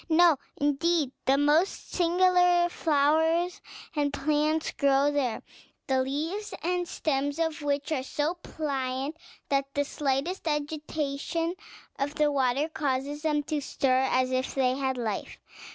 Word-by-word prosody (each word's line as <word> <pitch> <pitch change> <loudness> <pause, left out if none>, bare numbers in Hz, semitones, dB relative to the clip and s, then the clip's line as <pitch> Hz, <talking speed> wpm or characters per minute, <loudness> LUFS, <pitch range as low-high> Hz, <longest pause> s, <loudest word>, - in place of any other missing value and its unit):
No, 330 -1 +6 0.2
indeed; 290 0 +1
the 270 +1 +4
most 300 +6 +2
singular 355 0 +4
flowers 320 +3 +2 0.3
and 290 -1 +1
plants 305 +2 0
grow 280 0 +3
there; 270 -6 -1 0.4
the 265 -1 +2
leaves 315 +11 -3
and 355 0 0
stems 285 -2 -1
of 320 -1 -1
which 285 0 -1
are 290 -4 +1
so 295 +4 -1
pliant, 275 -4 -3 0.3
that 275 0 0
the 285 0 +1
slightest 290 +6 -2
agitation 305 +2 -2 0.5
of 285 +2 -2
the 300 -1 +2
water 270 +1 +1
causes 290 -1 -2
them 300 -2 +1
to 295 0 -2
stir 260 -2 +1
as 255 0 +1
if 255 +1 -1
they 255 -2 +2
had 265 -1 -1
life. 220 -4 -3
290 Hz, 135 wpm, -28 LUFS, 275-320 Hz, 0.5 s, No